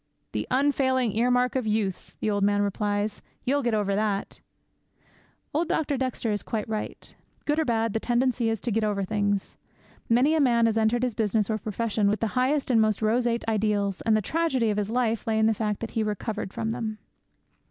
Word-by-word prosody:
'"The -, -, -3 dB
unfailing 260 Hz, -3 st, +2 dB
earmark 250 Hz, +2 st, +2 dB
of 255 Hz, -4 st, 0 dB
youth," 210 Hz, -3 st, -2 dB
the 215 Hz, -, +1 dB
old 205 Hz, -1 st, 0 dB
man 205 Hz, 0 st, +3 dB
replies; 205 Hz, +1 st, -1 dB, 0.2 s
"you'll 285 Hz, +3 st, +2 dB
get 240 Hz, -4 st, +1 dB
over 205 Hz, -2 st, 0 dB
that!"' 205 Hz, -1 st, -1 dB, 1.1 s
Old 320 Hz, +3 st, +1 dB
Dr. 295 Hz, -2 st, 0 dB
Dexter 255 Hz, -3 st, -2 dB
is 205 Hz, -, -1 dB
quite 220 Hz, -3 st, -3 dB
right. 215 Hz, -1 st, -5 dB, 0.3 s
Good 295 Hz, +1 st, +1 dB
or 320 Hz, -, +1 dB
bad, 225 Hz, -3 st, 0 dB
the 225 Hz, -, 0 dB
tendency 240 Hz, 0 st, +1 dB
is 225 Hz, -1 st, -1 dB
to 240 Hz, -, -2 dB
get 220 Hz, +1 st, +1 dB
over 205 Hz, -2 st, 0 dB
things. 205 Hz, 0 st, -1 dB, 0.5 s
Many 250 Hz, +7 st, +4 dB
a 320 Hz, -, +2 dB
man 235 Hz, -4 st, +4 dB
has 225 Hz, -1 st, +2 dB
entered 225 Hz, +2 st, +2 dB
his 250 Hz, -2 st, 0 dB
business 215 Hz, 0 st, 0 dB
or 220 Hz, -, -1 dB
profession 215 Hz, 0 st, -1 dB
with 210 Hz, +1 st, +1 dB
the -, -, 0 dB
highest 265 Hz, +2 st, +1 dB
and 225 Hz, -2 st, +5 dB
most 215 Hz, 0 st, +1 dB
roseate 235 Hz, +2 st, +1 dB
ideals, 205 Hz, -3 st, 0 dB
and 220 Hz, -1 st, +3 dB
the 215 Hz, -, -1 dB
tragedy 265 Hz, -, +1 dB
of 205 Hz, -, -2 dB
his 205 Hz, 0 st, -2 dB
life 230 Hz, -1 st, 0 dB
lay 220 Hz, -1 st, +1 dB
in 220 Hz, -, +3 dB
the 220 Hz, -, +4 dB
fact 210 Hz, -1 st, -2 dB
that 230 Hz, -, -4 dB
he 225 Hz, -, -1 dB
recovered 210 Hz, -1 st, -3 dB
from 225 Hz, +1 st, -2 dB
them. 220 Hz, -1 st, -3 dB
225 Hz, 205 wpm, -26 LUFS, 210-245 Hz, 1.1 s, and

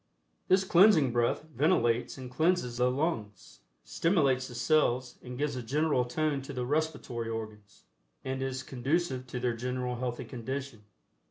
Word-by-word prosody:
This 190 Hz, +1 st, +4 dB
Cleansing 175 Hz, -, +5 dB
Breath 120 Hz, +3 st, +1 dB
ventilates 125 Hz, -5 st, +2 dB
and 130 Hz, -2 st, -8 dB
cleanses 155 Hz, -4 st, +1 dB
the 125 Hz, 0 st, +3 dB
lungs, 120 Hz, -, -3 dB, 0.2 s
stimulates 140 Hz, -7 st, +1 dB
the 120 Hz, -, -10 dB
cells 125 Hz, -1 st, +1 dB
and 125 Hz, 0 st, -8 dB
gives 145 Hz, 0 st, -1 dB
a 125 Hz, -, -3 dB
general 140 Hz, +1 st, +1 dB
tone 145 Hz, +2 st, -1 dB
to 135 Hz, +2 st, -8 dB
the 125 Hz, -1 st, -2 dB
respiratory 145 Hz, -5 st, -2 dB
organs, 110 Hz, -3 st, -7 dB, 0.4 s
and 130 Hz, 0 st, -3 dB
is 130 Hz, 0 st, -3 dB
conducive 130 Hz, 0 st, -1 dB
to 125 Hz, 0 st, -4 dB
their 120 Hz, -1 st, 0 dB
general 125 Hz, +1 st, -3 dB
healthy 120 Hz, -1 st, -3 dB
condition. 130 Hz, -2 st, -6 dB
130 Hz, 150 wpm, -30 LUFS, 120-150 Hz, 0.4 s, Cleansing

